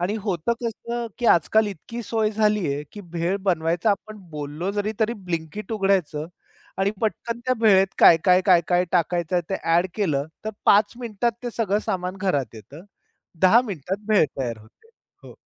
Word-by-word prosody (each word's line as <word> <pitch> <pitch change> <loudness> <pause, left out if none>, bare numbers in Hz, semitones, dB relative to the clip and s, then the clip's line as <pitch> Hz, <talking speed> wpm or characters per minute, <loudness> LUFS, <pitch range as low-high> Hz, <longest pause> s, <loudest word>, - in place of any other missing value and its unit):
आणि 180 +4 -1
होतं 190 0 -1
कसं, 235 +1 -4
की 240 - -1
आजकाल 215 +4 +4
इतकी 205 +5 -7
सोय 220 -1 0
झालीये, 210 -9 0
की 205 - -8
भेळ 175 0 -2
बनवायचा 170 +1 +1
आपण 215 +2 -3
बोललो 150 +4 -4
जरी, 205 +1 -2
तरी 220 +1 +2 0.2
ब्लिंकीट 170 +6 -4
उघडायचं 190 -7 0 0.5
आणि 195 +1 +2
पटकन 230 +1 -2
त्या 255 - +2
भेळेत 195 -4 +5
काय, 165 - +8
काय, 180 -1 +5
काय, 180 -3 +6
काय 180 0 +3
टाकायचं 175 0 0
आहे 175 - +1
ते 190 - 0
ॲड 170 +2 +3
केलं, 150 -9 0 0.2
तर 220 - -2
5 205 +1 +5
मिनिटात 235 0 -1
ते 245 - -3
सगळं 210 -3 +1
सामान 185 -3 -2
घरात 145 -11 -1
येतं. 135 - -12 0.6
10 190 +6 +6
मिनिटात 195 - -5
भेळ 210 -6 +5
तयार 120 -4 -3
होते. 110 - -21 0.4
हो. - - -13
190 Hz, 170 wpm, -23 LUFS, 170-215 Hz, 0.6 s, काय